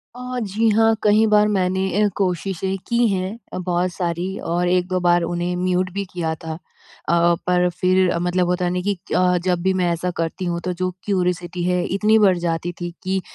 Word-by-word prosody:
अ, 250 0 -5
जी 220 +2 +1
हाँ 225 0 +4
कहीं 215 +1 +4
बार 210 0 +4
मैंने 190 -2 0 0.2
अ, - - +4
कोशिशें 190 0 -1
की 235 0 +2
हैं 190 +2 -2 0.2
अ, - - -3
बहुत 180 0 -1
सारी 180 +2 -3 0.2
और 175 +1 +1
1-2 180 +1 +1
बार 175 0 +3
उन्हें 175 +1 -2
म्यूट 185 +1 0
भी 200 0 -3
किया 165 -3 -1
था। 160 -1 -5 0.5
अ, - - +3 0.3
पर 180 0 +3
फिर 185 -1 +3
मतलब 180 +1 0
होता 180 0 0
है 175 - 0
न 180 0 -1
कि 205 +1 +1 0.2
अ, 180 -1 +3
जब 180 -2 +1
भी 190 +1 +2
मैं 180 -2 +1
ऐसा 170 +2 -2
करती 165 +3 -2
हूँ, 170 -1 -1
तो 180 - 0
जो 185 +1 -2
क्यूरियोसिटी 180 -3 -1
है, 180 0 +1
इतनी 215 +2 +4
बढ़ 190 -4 +4
जाती 170 0 -2
थी, 175 - -2
कि 190 0 -1
180 Hz, 200 wpm, -21 LUFS, 175-195 Hz, 0.5 s, हाँ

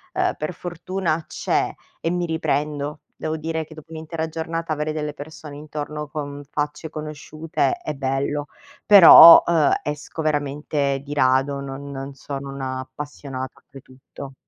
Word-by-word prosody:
uhm, - - +1
per 155 +3 -3
fortuna 175 -1 -3
c'è - - -1 0.3
e 165 - -1
mi 175 0 -1
riprendo. 150 -2 -2 0.2
Devo 155 0 -3
dire 160 +1 -3
che 155 - -14
dopo 155 +1 -14
un'intera 160 0 -4
giornata 165 0 -3
avere 150 0 -2
delle 150 -1 -3
persone 150 0 -10
intorno 150 0 -6
con 145 -1 -6
facce 150 +2 -3
conosciute 155 - -3
è 355 - -5
bello; 140 +2 -2 0.4
però, 170 -4 +11
uhm, 160 -4 +3
esco 150 +2 -5
veramente 145 -2 -1
di 145 - -5
rado, 135 0 +2
non 140 +1 -7
non 135 0 -6
sono 140 0 -6
un'appassionata 130 0 -6
oltretutto. 135 0 -12
150 Hz, 135 wpm, -22 LUFS, 140-160 Hz, 0.4 s, però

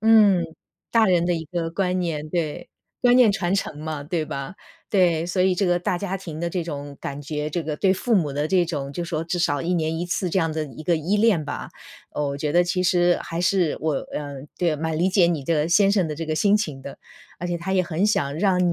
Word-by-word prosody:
嗯， 210 -5 +5 0.5
大 230 -1 +5
人 175 -2 +3
的 175 - +2
一 160 -1 -4
个 165 0 -3
观 185 +1 0
念。 155 -4 -2
对， 155 -3 -3 0.3
观 245 0 +6
念 235 -5 +6
传 175 -1 -1
承 195 -6 -1
嘛， 155 -2 -4
对 160 0 -1
吧？ 145 +4 -5 0.4
对， 175 -4 +3
所 180 +1 +1
以 185 -1 +3
这 195 +1 +1
个 175 0 +2
大 175 0 -1
家 195 0 -3
庭 165 -4 -7
的 170 - -1
这 175 -1 -2
种 145 -3 -6
感 140 +1 -5
觉， 150 +1 -4
这 170 +2 -2
个 150 -1 -3
对 190 +2 +3
父 230 +4 0
母 155 -7 +2
的 145 +2 -1
这 185 -2 +3
种， 145 -4 -4
就 170 +4 -4
是 170 - -8
说 160 -2 -1
至 170 +2 -2
少 145 -4 +1
1 175 +2 0
年 160 -1 -1
1 175 - -3
次 180 0 -1
这 190 - +1
样 165 -3 +1
的 155 0 -2
一 150 +2 -10
个 170 0 +2
依 185 +7 0
恋 205 -8 +3
吧。 - - -5 0.4
哦， 150 -1 -2
我 140 - -3
觉 150 +1 -1
得 175 0 +4
其 180 +1 0
实 175 -1 +3
还 165 - -5
是 180 -2 +2
我 155 -3 +1
呃， 145 -2 -5 0.2
对 175 -2 +1
呀， 155 - -1
蛮 160 +1 -2
理 185 +3 +2
解 185 -2 +4
你 160 -5 -1
的 155 +1 +1
先 200 +3 +4
生 185 -6 +2
的 150 - -3
这 165 +2 -4
个 155 0 -2
心 205 +5 +4
情 150 -10 -3
的。 140 +1 -9 0.4
而 175 - -4
且 175 -1 -2
他 180 +3 -3
也 185 - +3
很 175 +3 0
想 145 -8 0
让 180 -2 +2
170 Hz, 270 characters per minute, -23 LUFS, 155-185 Hz, 0.5 s, 观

